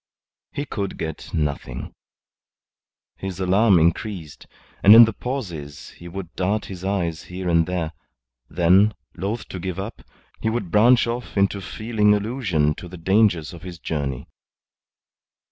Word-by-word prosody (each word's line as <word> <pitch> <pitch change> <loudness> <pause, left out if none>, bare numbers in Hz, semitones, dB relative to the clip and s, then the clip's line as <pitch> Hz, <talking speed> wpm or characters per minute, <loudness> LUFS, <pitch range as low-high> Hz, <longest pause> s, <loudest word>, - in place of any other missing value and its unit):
He 145 - -4
could 100 -7 -4
get 80 -1 -6
nothing. 75 -2 -3 1.2
His 95 -1 -6
alarm 95 +2 +4
increased, 85 -1 -1 0.3
and 105 +3 +9
in 115 0 +11
the 110 - -3
pauses 90 - -6
he 85 - -12
would 90 -1 -7
dart 100 +4 0
his 95 -2 -8
eyes 90 -5 -2
here 90 0 -6
and 85 -1 +3
there; 90 -3 -2 0.6
then, 95 +5 +4 0.2
loth 100 +6 -4
to 95 - -6
give 90 0 -4
up, 100 +4 -6 0.4
he 110 - +1
would 110 -6 -3
branch 120 +4 +5
off 120 -2 -5
into 100 0 +2
feeling 105 0 +1
allusion 100 - 0
to 90 - -8
the 90 +1 -10
dangers 95 -3 +2
of 85 - -10
his 90 -2 -8
journey. 70 -6 -4
95 Hz, 145 wpm, -23 LUFS, 85-105 Hz, 1.2 s, in